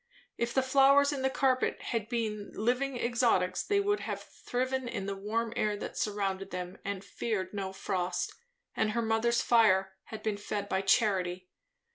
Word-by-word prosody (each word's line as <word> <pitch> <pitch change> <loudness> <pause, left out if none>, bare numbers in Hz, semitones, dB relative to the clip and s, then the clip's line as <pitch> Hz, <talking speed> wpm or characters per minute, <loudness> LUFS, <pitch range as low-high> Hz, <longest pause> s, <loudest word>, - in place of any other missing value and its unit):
If 235 +1 -2
the 265 - +4
flowers 275 +2 +5
in 275 - -3
the 265 - +2
carpet 265 -1 +1
had 225 -3 -3
been 215 -4 -2
living 250 +4 0
exotics, 235 -7 +2
they 405 -1 +1
would 410 0 +1
have - - -4
thriven 255 +1 -3
in 200 -4 -3
the 200 0 -3
warm 220 +3 -2
air 210 -3 0
that - - -6
surrounded 195 -2 -2
them, 180 0 -6
and 200 -1 -4
feared 200 -2 -3
no 195 -2 -3
frost; 185 -1 -2 0.4
and 215 -1 +1
her 235 0 0
mother's 225 +1 +2
fire 195 -5 +4
had 220 - -8
been 215 -2 -1
fed 205 0 -3
by 190 -1 0
charity! 185 -3 +1
220 Hz, 170 wpm, -31 LUFS, 195-245 Hz, 0.4 s, flowers